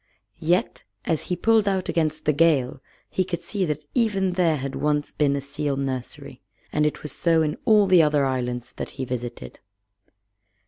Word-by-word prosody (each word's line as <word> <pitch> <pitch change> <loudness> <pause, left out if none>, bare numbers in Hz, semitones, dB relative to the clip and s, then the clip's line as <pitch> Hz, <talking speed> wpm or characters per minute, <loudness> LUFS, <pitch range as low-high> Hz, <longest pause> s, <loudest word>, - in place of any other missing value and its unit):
Yet 175 +3 0 0.2
as 160 -2 0
he 180 - +1
pulled 220 +3 +3
out 190 -2 0
against 155 -2 -1
the 150 - +3
gale 140 -4 +2 0.3
he 185 - 0
could 175 -2 -4
see 185 +3 -2
that 150 -2 -3
even 205 -6 +1
there 175 -4 +2
had 135 0 -4
once 150 0 0
been 140 -2 +1
a 140 - -2
seal 140 0 -3
nursery. 130 -3 -5 0.3
And 150 0 +3
it 150 - -4
was 150 - -3
so 165 +1 +2
in 150 -1 -1
all 215 -3 +5
the 185 -3 +6
other 150 -2 +3
islands 125 -2 -2
that - - -4
he 130 - -2
visited. 120 -1 -6
150 Hz, 180 wpm, -24 LUFS, 140-180 Hz, 0.3 s, the